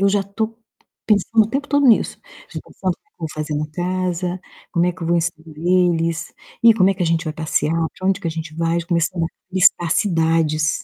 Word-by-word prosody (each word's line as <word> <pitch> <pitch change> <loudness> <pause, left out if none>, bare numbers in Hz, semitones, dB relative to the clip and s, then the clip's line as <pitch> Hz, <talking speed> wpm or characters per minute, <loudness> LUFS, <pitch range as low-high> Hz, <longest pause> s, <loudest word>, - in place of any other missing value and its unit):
Eu 200 - +4
já 200 0 +2
tô 220 +3 -4 0.5
pensando 215 +1 +3
o - - -6
tempo 275 +3 -2
todo 285 -1 +3
nisso. 230 - +3 0.3
Já - - -6
tô - - -20
pensando 185 -1 -2
no - - -9
que 425 - -40
eu - - -55
vou 160 - -3
fazer 155 0 -3
na 150 +1 -1
casa, 180 +1 -2 0.3
como 170 0 +2
é 180 - +1
que 170 - -11
eu - - -2
vou 170 - +2
receber 165 -2 -3
eles, 170 -2 +1 0.3
e 230 - +8
como 190 -3 +4
é - - 0
que 185 - -3
a - - +1
gente 165 0 +1
vai 155 - -3
passear, 160 0 0 0.2
pra 185 - -1
onde 195 - +1
que 165 - -2
a - - -2
gente 160 -1 -6
vai, 165 +1 0
já 170 - -9
comecei 170 0 0
a - - +2 0.3
listar 175 -2 +4
cidades. 165 -5 +1
175 Hz, 245 wpm, -20 LUFS, 165-190 Hz, 0.5 s, e